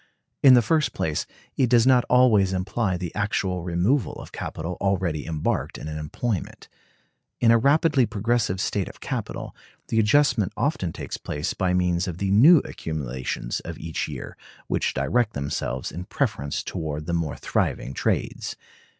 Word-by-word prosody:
In 130 -2 +8
the 120 - +5
first 155 +5 +1
place, 75 -2 -2 0.3
it 130 -3 +2
does 120 -1 +5
not 130 -2 +5
always 110 -7 +5
imply 95 +1 -1
the 90 -2 -5
actual 105 -4 -1
removal 90 - +1
of - - -10
capital 85 +3 -5
already 90 -6 0
embarked 80 -2 -2
in - - -7
an 75 0 -4
employment. 95 +6 -4 0.7
In 115 - +5
a 115 - +5
rapidly 140 0 +3
progressive 110 -3 0
state 100 0 -1
of - - -14
capital, - - -5 0.3
the 115 - +2
adjustment 110 -3 +3
often 105 - 0
takes - - -6
place 75 +1 -3
by 90 -1 0
means 90 0 +1
of 85 -2 -4
the 95 +1 -1
new 140 - +7
accumulations 65 -6 -4
of - - -7
each 80 -1 -3
year, - - -7 0.3
which - - -1
direct 105 - +1
themselves 70 -3 -3
in 90 +1 -6
preference 70 -5 -2
toward 75 -1 -4
the 85 - -3
more 80 -4 -1
thriving 65 - -1
trades. - - -2
95 Hz, 160 wpm, -24 LUFS, 80-120 Hz, 0.7 s, In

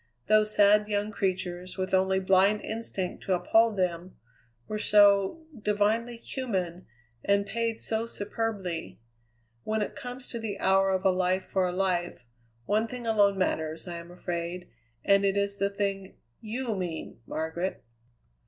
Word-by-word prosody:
Those 215 0 +4
sad 210 +1 +5
young 205 0 -1
creatures, 185 -2 -3
with 185 0 -3
only 190 0 +3
blind 190 +2 +3
instinct 220 -5 -4
to 190 - +1
uphold 220 +4 +3
them, 180 -1 -2 0.5
were 215 - -3
so 205 +8 +4
divinely 215 +2 0
human, 190 -9 -4 0.4
and 200 0 +2
paid 230 +1 -2
so 225 +1 -2
superbly. 205 -6 -4 0.6
When 215 0 0
it - - -6
comes 250 -2 -6
to 235 - -4
the 215 -3 -4
hour 195 0 +3
of 190 0 0
a 190 - +6
life 185 +1 +1
for 190 -1 0
a - - -2
life, 180 -7 -1 0.4
one 215 +2 +1
thing 245 0 -7
alone 205 -3 +3
matters, 160 -3 -1
I 175 -1 -5
am 170 0 -9
afraid, 175 0 -5 0.4
and 200 0 +5
it 195 0 +2
is 200 0 0
the 200 0 +2
thing 195 -1 -3 0.2
you 230 +1 -3
mean, 175 -9 -5
Margaret." 160 +4 -3
200 Hz, 150 wpm, -28 LUFS, 185-215 Hz, 0.6 s, a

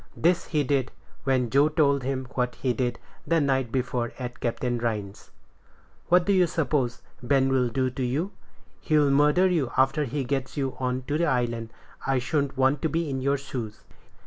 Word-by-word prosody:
This 170 +1 +2
he 150 -3 +1
did, 135 -1 0 0.3
when 130 -3 +1
Joe 140 +3 +4
told 145 -3 +2
him 130 0 -2
what 125 -1 -1
he 130 -2 -1
did 120 -1 -1 0.3
the 165 -1 +3
night 135 -4 +1
before 125 -2 -1
at 125 -2 -6
Captain 120 +1 -1
Rhines's. 105 -4 -4 0.8
"What 180 0 +4
do 200 - +3
you 185 -2 +4
suppose 140 -7 -1 0.2
Ben'll 130 0 +2
do 130 +2 0
to 130 - -6
you? 145 +11 -1 0.5
He'll 150 -3 +3
murder 150 +6 +4
you 165 -8 0
after 135 +3 +3
he 140 +2 -2
gets 135 +2 -3
you 135 -2 -1
on 130 0 -1
to 145 +4 -2
the 170 - +2
island. 120 -4 -1 0.4
I 135 -1 +2
shouldn't 140 +2 -1
want 135 +2 +2
to 160 - 0
be 165 -2 -1
in 130 -1 -2
your 140 +2 +1
shoes." 120 -6 -6
135 Hz, 180 wpm, -26 LUFS, 125-150 Hz, 0.8 s, Joe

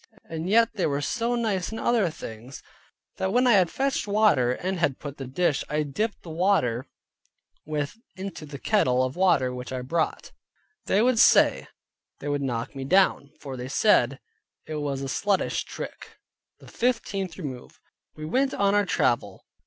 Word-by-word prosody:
And 165 +2 -4
yet 230 +2 +4
they 190 - 0
were 140 -1 -1
so 235 +10 -1
nice 215 -6 -1
in 225 - -5
other 225 -7 +2
things, 120 -3 -9 0.5
that 190 - -1
when 250 +4 +3
I 245 - +5
had 185 -6 +5
fetched 270 +3 -1
water, 200 - +3
and 185 +8 -3
had 140 -6 +1
put 145 -1 -8
the 135 - -6
dish 145 +2 0
I 150 +1 0
dipped 205 +10 -3
the 165 - -8
water 160 -9 +1 0.8
with 150 +6 -3 0.2
into 185 -5 -7
the 145 -1 -7
kettle 130 - +2
of 130 +1 -3
water 165 -9 +2
which 125 0 -7
I 130 -1 -4
brought, 160 +5 -2 0.6
they 205 +3 +3
would 250 -2 +3
say - - +5 0.5
they - - -7
would 145 -1 -1
knock 120 -2 -3
me 135 - -5
down; 145 -2 +3
for 135 -2 -6
they 125 0 -6
said, 135 - +3 0.5
it 155 - -5
was 140 -2 -3
a - - -2
sluttish 195 +8 0
trick. - - -8 0.4
THE - - -16
FIFTEENTH 200 -7 -2
REMOVE 135 -8 -8 0.4
We 155 - -7
went 265 - +1
on 200 0 +2
our 205 -1 +2
travel. 120 -8 0
160 Hz, 175 wpm, -26 LUFS, 135-205 Hz, 0.8 s, I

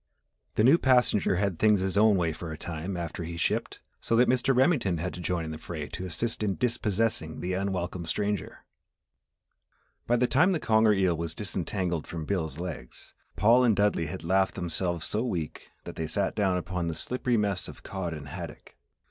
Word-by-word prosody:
The 110 - +3
new 140 +8 +6
passenger 125 -7 +3
had 95 -2 -1
things 105 -3 +4
his 95 0 -1
own 105 0 +5
way 85 -3 0
for 80 +1 -7
a 80 - -6
time 85 +3 -4
after 85 0 -4
he 85 +1 -6
shipped - - -1 0.2
so 115 - 0
that 125 +2 +5
Mr. 130 +1 +2
Remington 130 - +3
had 90 +3 -3
to - - -8
join 85 0 -1
in 80 - -5
the 80 - -6
fray 80 -3 -6
to 95 - -5
assist 115 +7 -2
in 100 -3 0
dispossessing 110 -8 0
the 90 +1 -2
unwelcome 90 -3 -2
stranger. 105 +3 -2 1.4
By 120 - +3
the 125 +1 +3
time 160 +10 +4
the 165 - 0
conger 110 -3 +4
eel 95 -3 +2
was 80 0 -4
disentangled 95 -4 -2
from 80 -2 -5
Bill's 80 -7 -2
legs, 85 -7 -7 0.2
Paul 120 +4 +5
and 115 -4 +4
Dudley 100 -5 +2
had 80 - -6
laughed 95 +3 +2
themselves 85 -1 -2
so 110 +2 -1
weak 85 -11 -4
that - - -9
they 80 - -2
sat 95 +5 0
down 95 -4 +1
upon 90 -1 -3
the 80 - -2
slippery 125 +3 -1
mess 100 -3 0
of - - -11
cod 95 -3 -4
and 75 -3 -7
haddock. - - -8
95 Hz, 195 wpm, -28 LUFS, 85-110 Hz, 1.4 s, new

